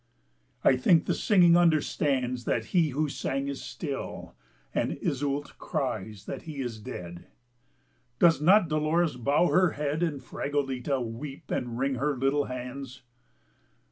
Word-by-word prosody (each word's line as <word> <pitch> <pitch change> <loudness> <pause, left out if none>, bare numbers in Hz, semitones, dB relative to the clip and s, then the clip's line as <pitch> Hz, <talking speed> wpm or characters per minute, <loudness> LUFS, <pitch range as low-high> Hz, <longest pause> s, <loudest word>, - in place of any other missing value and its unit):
I 130 - +5
think 160 +6 +4
the - - +1
singing 180 -6 +5
understands 140 -7 +1
That 110 - 0
he 170 -4 +4
who 150 +3 0
sang 135 -1 -2
is 140 -1 -4
still, 140 -5 -6 0.4
And - - 0
Iseult 140 +1 -3
cries 110 -8 -3
that - - -5
he 155 -3 -8
is 120 -4 -4
dead, 85 -4 -8 0.9
Does 165 -3 +5
not 185 +3 +5
Dolores 155 0 +1
bow 140 +8 +2
her 180 -2 +3
head 150 +2 -2
And 160 -5 0
Fragoletta 135 -1 -2
weep 125 +5 -7
and 120 -1 -2
wring 135 +1 0
her 145 -1 0
little 135 +3 +1
hands? 130 +1 -7
140 Hz, 140 wpm, -28 LUFS, 125-155 Hz, 0.9 s, I